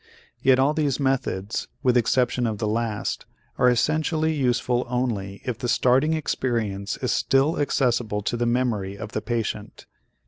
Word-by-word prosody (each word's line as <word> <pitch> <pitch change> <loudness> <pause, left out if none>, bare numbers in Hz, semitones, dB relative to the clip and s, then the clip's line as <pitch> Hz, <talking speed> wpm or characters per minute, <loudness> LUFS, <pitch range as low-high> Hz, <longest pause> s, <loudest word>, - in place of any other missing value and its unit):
Yet 130 -1 +5
all 135 +3 +3
these 150 -4 0
methods, 125 -7 -1 0.2
with 125 -2 +3
exception 120 +1 +2
of 110 -2 -2
the 105 - -2
last, 110 -1 -2 0.3
are 125 - +5
essentially 155 +5 +1
useful 125 -3 +1
only 110 -6 -2
if 125 -3 -3
the 125 - -2
starting 135 +7 +3
experience 110 -9 -2
is 125 - +1
still 135 +5 +2
accessible 120 -7 0
to 110 - -1
the 120 0 0
memory 115 -6 0
of 110 0 -7
the 110 - -2
patient. 115 0 -4
125 Hz, 150 wpm, -24 LUFS, 110-135 Hz, 0.3 s, Yet